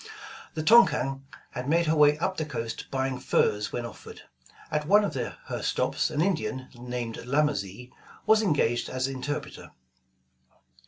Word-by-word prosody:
The 155 Hz, -, -2 dB
Tonquin 135 Hz, -10 st, +4 dB, 0.3 s
had 125 Hz, +2 st, -5 dB
made 170 Hz, +2 st, +3 dB
her 160 Hz, 0 st, +2 dB
way 150 Hz, -1 st, +5 dB
up 190 Hz, +4 st, -2 dB
the 160 Hz, -, 0 dB
coast 115 Hz, -7 st, -5 dB
buying 130 Hz, -1 st, -2 dB
furs 105 Hz, 0 st, +1 dB
when 120 Hz, -, -3 dB
offered. 120 Hz, -, -11 dB, 0.5 s
At 150 Hz, 0 st, -1 dB
one 205 Hz, +4 st, +6 dB
of 200 Hz, -, -2 dB
her 125 Hz, -4 st, -5 dB
stops -, -, 0 dB
an 150 Hz, -, -1 dB
Indian, 155 Hz, -8 st, -1 dB
named 120 Hz, -1 st, -5 dB
Lamazee, 125 Hz, -4 st, -1 dB, 0.3 s
was 220 Hz, +1 st, +5 dB
engaged 145 Hz, -, +1 dB
as 130 Hz, 0 st, -1 dB
interpreter. 135 Hz, +2 st, -5 dB
135 Hz, 145 wpm, -27 LUFS, 125-155 Hz, 0.5 s, one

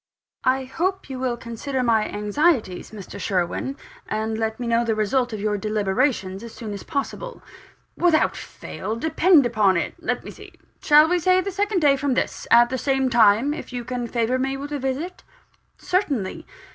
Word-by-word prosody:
"I 265 Hz, +1 st, +2 dB
hope 355 Hz, +5 st, -3 dB
you 260 Hz, -, -5 dB
will 250 Hz, -2 st, -1 dB
consider 250 Hz, +3 st, -4 dB
my 225 Hz, -3 st, +2 dB
anxieties, 210 Hz, -, 0 dB
Mr. 205 Hz, -4 st, -9 dB
Sherwin, 190 Hz, +9 st, -2 dB, 0.3 s
and 220 Hz, +1 st, -2 dB
let 220 Hz, 0 st, -2 dB
me 245 Hz, -, -3 dB
know 235 Hz, 0 st, +2 dB
the 225 Hz, -2 st, 0 dB
result 240 Hz, +4 st, +1 dB
of 215 Hz, -, -4 dB
your 210 Hz, 0 st, -1 dB
deliberations 210 Hz, 0 st, 0 dB
as 235 Hz, -, -10 dB
soon 215 Hz, -3 st, -6 dB
as 200 Hz, -, -6 dB
possible." 400 Hz, -, -5 dB, 0.5 s
"Without 340 Hz, -3 st, +3 dB
fail, 220 Hz, -, -6 dB
depend 320 Hz, +3 st, +4 dB
upon 210 Hz, -6 st, +3 dB
it. -, -, -2 dB
Let -, -, -2 dB
me -, -, -8 dB
see: -, -, -13 dB, 0.3 s
shall 300 Hz, +1 st, +6 dB
we 355 Hz, +1 st, +2 dB
say 370 Hz, +2 st, +3 dB
the 390 Hz, +2 st, -2 dB
second 400 Hz, -1 st, 0 dB
day 280 Hz, -2 st, +4 dB
from 275 Hz, -2 st, 0 dB
this, -, -, -2 dB
at 240 Hz, +1 st, +6 dB
the 260 Hz, -, -1 dB
same 265 Hz, 0 st, +1 dB
time, 230 Hz, +4 st, +4 dB
if -, -, -8 dB
you 245 Hz, -1 st, -5 dB
can 245 Hz, -1 st, -3 dB
favour 235 Hz, +2 st, 0 dB
me 270 Hz, +1 st, -1 dB
with 285 Hz, +2 st, -7 dB
a 290 Hz, -, -2 dB
visit?" 275 Hz, +7 st, -3 dB, 0.6 s
"Certainly." 295 Hz, -, -2 dB
255 Hz, 185 wpm, -23 LUFS, 220-290 Hz, 0.6 s, shall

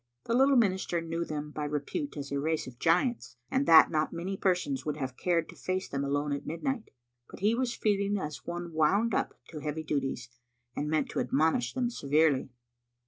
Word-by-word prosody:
The 230 Hz, -, -2 dB
little 270 Hz, +3 st, +5 dB
minister 190 Hz, -6 st, +2 dB
knew 165 Hz, 0 st, -3 dB
them 150 Hz, -2 st, -5 dB
by 150 Hz, -, -4 dB
repute 150 Hz, -, -3 dB
as 140 Hz, -1 st, -6 dB
a 140 Hz, -, 0 dB
race 160 Hz, +2 st, -1 dB
of 125 Hz, -1 st, -11 dB
giants, 175 Hz, -, +1 dB
and 270 Hz, +1 st, +1 dB
that 160 Hz, -, +8 dB
not 155 Hz, -1 st, +1 dB
many 180 Hz, +4 st, -3 dB
persons 180 Hz, -9 st, 0 dB
would 150 Hz, 0 st, -3 dB
have 130 Hz, -3 st, -4 dB
cared 170 Hz, +1 st, +1 dB
to -, -, -11 dB
face 185 Hz, +1 st, -2 dB
them 140 Hz, 0 st, -3 dB
alone 145 Hz, +1 st, 0 dB
at 140 Hz, -, -3 dB
midnight; 230 Hz, -, -3 dB, 0.4 s
but -, -, -11 dB
he 210 Hz, +3 st, +3 dB
was 240 Hz, 0 st, -1 dB
feeling 205 Hz, -1 st, +1 dB
as 150 Hz, -4 st, -5 dB
one 175 Hz, -1 st, -5 dB
wound 200 Hz, +9 st, +2 dB
up -, -, 0 dB
to 155 Hz, -, -7 dB
heavy 150 Hz, +1 st, -3 dB
duties, 135 Hz, -5 st, -2 dB, 0.5 s
and 150 Hz, -, -2 dB
meant 155 Hz, 0 st, +1 dB
to -, -, -2 dB
admonish 160 Hz, -, +1 dB
them 245 Hz, -2 st, 0 dB
severely. 145 Hz, -, +2 dB
160 Hz, 195 wpm, -30 LUFS, 145-200 Hz, 0.5 s, that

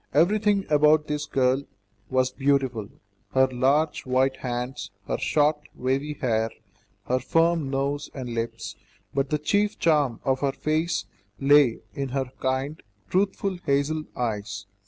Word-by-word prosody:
Everything 205 Hz, +2 st, +3 dB
about 150 Hz, 0 st, +4 dB
this 150 Hz, 0 st, -3 dB
girl 130 Hz, 0 st, +2 dB, 0.5 s
was 130 Hz, 0 st, +2 dB
beautiful; 130 Hz, -6 st, 0 dB, 0.4 s
her 130 Hz, 0 st, +5 dB
large, 135 Hz, +5 st, +1 dB
white 130 Hz, +1 st, +1 dB
hands, 125 Hz, 0 st, -4 dB, 0.2 s
her -, -, -1 dB
short, 150 Hz, 0 st, +2 dB, 0.2 s
wavy 135 Hz, +4 st, -1 dB
hair, 115 Hz, -5 st, 0 dB, 0.6 s
her 130 Hz, +1 st, +1 dB
firm 165 Hz, +2 st, +2 dB
nose 140 Hz, +2 st, -1 dB
and 125 Hz, -3 st, -5 dB
lips, 115 Hz, 0 st, -4 dB, 0.4 s
but 135 Hz, 0 st, 0 dB
the 150 Hz, -, +1 dB
chief 205 Hz, +8 st, +1 dB
charm 145 Hz, -8 st, +2 dB
of 130 Hz, -1 st, +1 dB
her 140 Hz, -1 st, 0 dB
face 155 Hz, -7 st, -1 dB, 0.3 s
lay 140 Hz, -4 st, +5 dB
in 135 Hz, -1 st, -3 dB
her 130 Hz, -1 st, -2 dB
kind, 135 Hz, +4 st, -1 dB, 0.3 s
truthful 195 Hz, 0 st, 0 dB
hazel 145 Hz, +3 st, +1 dB
eyes. 105 Hz, -4 st, -3 dB
135 Hz, 135 wpm, -25 LUFS, 130-150 Hz, 0.6 s, her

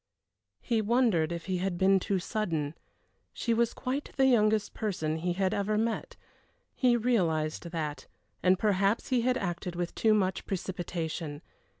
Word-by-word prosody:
He 230 Hz, -3 st, +1 dB
wondered 215 Hz, -8 st, +2 dB
if 170 Hz, -1 st, -4 dB
he 185 Hz, -2 st, -1 dB
had 185 Hz, -1 st, -1 dB
been 190 Hz, +1 st, +4 dB
too 195 Hz, +1 st, -1 dB
sudden. 170 Hz, -7 st, -2 dB, 0.6 s
She 235 Hz, -, 0 dB
was 235 Hz, 0 st, +2 dB
quite 270 Hz, +2 st, -3 dB
the 270 Hz, -, +5 dB
youngest 215 Hz, -4 st, +3 dB
person 160 Hz, -8 st, -2 dB
he 175 Hz, +2 st, -1 dB
had 190 Hz, +1 st, 0 dB
ever 210 Hz, +1 st, 0 dB
met 225 Hz, +1 st, -2 dB, 0.6 s
he 245 Hz, -2 st, +3 dB
realized 170 Hz, -11 st, 0 dB
that, 150 Hz, -4 st, -4 dB, 0.3 s
and 185 Hz, +1 st, +4 dB
perhaps 200 Hz, +1 st, +1 dB
he 255 Hz, -2 st, +2 dB
had 250 Hz, +1 st, +2 dB
acted 175 Hz, -1 st, -3 dB
with 175 Hz, 0 st, -3 dB
too 220 Hz, -1 st, +3 dB
much 190 Hz, -2 st, 0 dB
precipitation. 170 Hz, -4 st, -4 dB
195 Hz, 155 wpm, -29 LUFS, 175-220 Hz, 0.6 s, the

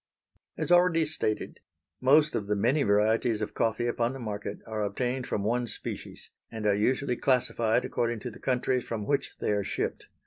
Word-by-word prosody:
As -, -, -2 dB
already 175 Hz, -2 st, +5 dB
stated, 150 Hz, -8 st, -1 dB, 0.4 s
most 150 Hz, +4 st, +5 dB
of 105 Hz, -, -2 dB
the 105 Hz, -, +1 dB
many 120 Hz, +9 st, +2 dB
varieties 110 Hz, +1 st, +2 dB
of 105 Hz, -1 st, -4 dB
coffee 115 Hz, +1 st, 0 dB
upon 120 Hz, +1 st, 0 dB
the 135 Hz, -, -7 dB
market 105 Hz, -3 st, -4 dB
are 110 Hz, -1 st, -3 dB
obtained 125 Hz, +5 st, -2 dB
from 100 Hz, -, -1 dB
one 120 Hz, +3 st, 0 dB
species, -, -, -6 dB, 0.2 s
and 110 Hz, -2 st, -5 dB
are 105 Hz, -, +4 dB
usually 125 Hz, +5 st, +1 dB
classified 120 Hz, -2 st, +1 dB
according 120 Hz, -2 st, -1 dB
to 125 Hz, -, -5 dB
the -, -, -13 dB
countries 125 Hz, -1 st, 0 dB
from 110 Hz, -3 st, -4 dB
which 140 Hz, +2 st, -1 dB
they -, -, -1 dB
are 105 Hz, -1 st, +1 dB
shipped. -, -, -3 dB
120 Hz, 180 wpm, -28 LUFS, 105-130 Hz, 0.4 s, already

